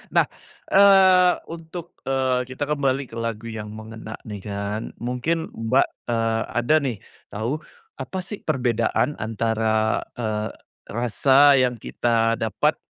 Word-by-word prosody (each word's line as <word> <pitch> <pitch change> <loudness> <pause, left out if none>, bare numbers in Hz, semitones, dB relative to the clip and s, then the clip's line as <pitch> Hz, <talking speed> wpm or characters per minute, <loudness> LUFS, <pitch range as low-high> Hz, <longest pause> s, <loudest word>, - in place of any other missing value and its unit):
Nah, - - +6 0.5
eee, 190 -2 +7
untuk, 165 +1 -8
eee, 130 -1 +1
kita 130 - -3
kembali 140 -2 +1
ke 115 - -12
lagu 115 -1 -4
yang 110 -2 -6
mengena 110 0 -8
nih 105 -2 -6
kan, 100 +1 -3 0.2
mungkin 125 +7 -1
Mbak, 115 +4 +2 0.2
eee, 115 -1 +1
ada 120 +6 +2
nih 125 -6 -2 0.3
tahu, 115 +9 -2 0.4
apa 190 - -5
sih 195 +3 -7
perbedaan 125 0 +1
antara, 110 0 0 0.2
eee, 110 -1 -1 0.4
rasa 135 +5 +5
yang 125 -2 +2
kita 115 +1 +1
dapat 110 -2 0
120 Hz, 125 wpm, -23 LUFS, 110-145 Hz, 0.5 s, eee